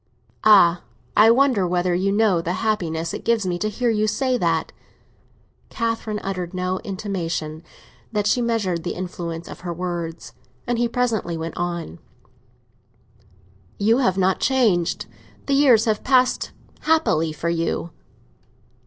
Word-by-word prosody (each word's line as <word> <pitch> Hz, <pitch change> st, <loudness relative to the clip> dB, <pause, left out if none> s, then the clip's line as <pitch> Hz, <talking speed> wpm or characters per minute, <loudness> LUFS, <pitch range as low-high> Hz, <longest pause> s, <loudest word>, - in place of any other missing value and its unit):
"Ah, 180 Hz, -5 st, +6 dB, 0.3 s
I 215 Hz, +1 st, +7 dB
wonder 235 Hz, -6 st, +3 dB
whether 180 Hz, 0 st, 0 dB
you 190 Hz, +3 st, +1 dB
know 205 Hz, -4 st, +3 dB
the 170 Hz, +2 st, -2 dB
happiness 165 Hz, -6 st, -1 dB
it -, -, -6 dB
gives 230 Hz, -3 st, +1 dB
me 175 Hz, -1 st, -2 dB
to 215 Hz, -, -1 dB
hear 240 Hz, +3 st, 0 dB
you 215 Hz, -1 st, +1 dB
say 255 Hz, +4 st, 0 dB
that!" 165 Hz, -7 st, 0 dB, 1.0 s
Catherine 230 Hz, -2 st, -2 dB
uttered 185 Hz, -2 st, -4 dB
no 185 Hz, 0 st, -1 dB
intimation 175 Hz, -6 st, -4 dB, 0.5 s
that 210 Hz, -2 st, -1 dB
she 245 Hz, +4 st, +2 dB
measured 215 Hz, -8 st, 0 dB
the 175 Hz, -, -4 dB
influence 175 Hz, -2 st, -5 dB
of -, -, -9 dB
her 175 Hz, -1 st, -5 dB
words; 170 Hz, -1 st, -5 dB, 0.3 s
and 240 Hz, -1 st, -1 dB
he 240 Hz, -, +2 dB
presently 230 Hz, -8 st, -1 dB
went 160 Hz, 0 st, -5 dB
on, 170 Hz, -, -4 dB, 1.8 s
"You 225 Hz, +5 st, +3 dB
have 190 Hz, -8 st, +1 dB
not 190 Hz, 0 st, +2 dB
changed—the 235 Hz, +2 st, -1 dB
years 260 Hz, -6 st, +5 dB
have 215 Hz, -2 st, 0 dB
passed 255 Hz, -1 st, +2 dB, 0.3 s
happily 300 Hz, -, +2 dB
for 155 Hz, +2 st, -3 dB
you." 165 Hz, 0 st, -2 dB
190 Hz, 135 wpm, -22 LUFS, 170-230 Hz, 1.8 s, I